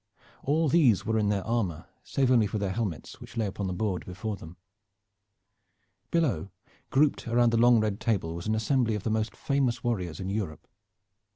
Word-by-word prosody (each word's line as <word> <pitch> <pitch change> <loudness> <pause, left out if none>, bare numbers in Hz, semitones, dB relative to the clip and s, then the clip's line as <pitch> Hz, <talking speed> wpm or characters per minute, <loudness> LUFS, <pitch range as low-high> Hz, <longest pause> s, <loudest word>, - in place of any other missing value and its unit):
All 155 +3 +1
these 135 - +4
were 110 0 +1
in 105 -1 +1
their 100 -2 0
armor, 110 -9 -1 0.2
save 135 -2 0
only 115 -4 +4
for 105 - -3
their 100 -2 -1
helmets, 100 -6 -4
which - - -11
lay 110 - +1
upon 100 0 -3
the - - -2
board 95 -1 -2
before 105 +4 -5
them. 85 -2 -12 1.5
Below, 130 - 0 0.4
grouped 140 -2 +2
around 120 0 +3
the 115 - +2
long 120 -1 +6
red 105 -1 -1
table, 95 -8 0
was 85 +4 -6
an 110 - +1
assembly 115 0 +1
of 105 - -4
the 110 - -1
most 110 -1 -1
famous 130 -4 0
warriors 95 -9 -2
in 95 0 -3
Europe. 95 -8 -4
110 Hz, 185 wpm, -28 LUFS, 95-120 Hz, 1.5 s, long